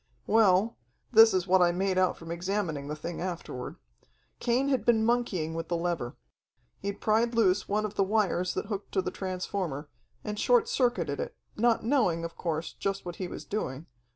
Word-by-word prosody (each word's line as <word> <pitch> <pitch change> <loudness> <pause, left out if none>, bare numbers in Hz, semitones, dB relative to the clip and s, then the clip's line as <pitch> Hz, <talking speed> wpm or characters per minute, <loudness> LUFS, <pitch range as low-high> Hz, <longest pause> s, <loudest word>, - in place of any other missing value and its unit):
"Well 215 0 +4 0.3
this 225 -1 +8
it 185 -2 +1
what 185 0 +4
I 175 -1 +5
made 190 +2 0
out 185 -1 +2
from 165 0 -8
examining 170 -5 -2
the 150 - -3
thing 170 +3 -6
afterward. 175 -8 -5 0.6
Cain 250 +4 +1
had 260 -6 +1
been 225 -1 +3
monkeying 215 -9 0
with 165 0 -4
the 170 - 0
lever. 170 -8 -2 0.6
He'd 200 0 -4
pried 230 +2 +2
loose 200 -4 +2
one 210 +1 +1
of 210 - -4
the 195 - +2
wires 190 -3 +1
that - - -2
hooked 200 -1 -5
to 190 - +1
the 180 - -3
transformer, 180 -6 -4 0.3
and 210 0 -4
short 480 -2 +4
circuited 250 - 0
it, - - -4 0.2
not 230 +1 +2
knowing, 220 - +2
of 165 - -7
course, 160 -1 -3
just 195 -1 -3
what 175 -1 -6
he 185 - -3
was - - -8
doing. 155 -8 -4
190 Hz, 185 wpm, -29 LUFS, 175-220 Hz, 0.6 s, this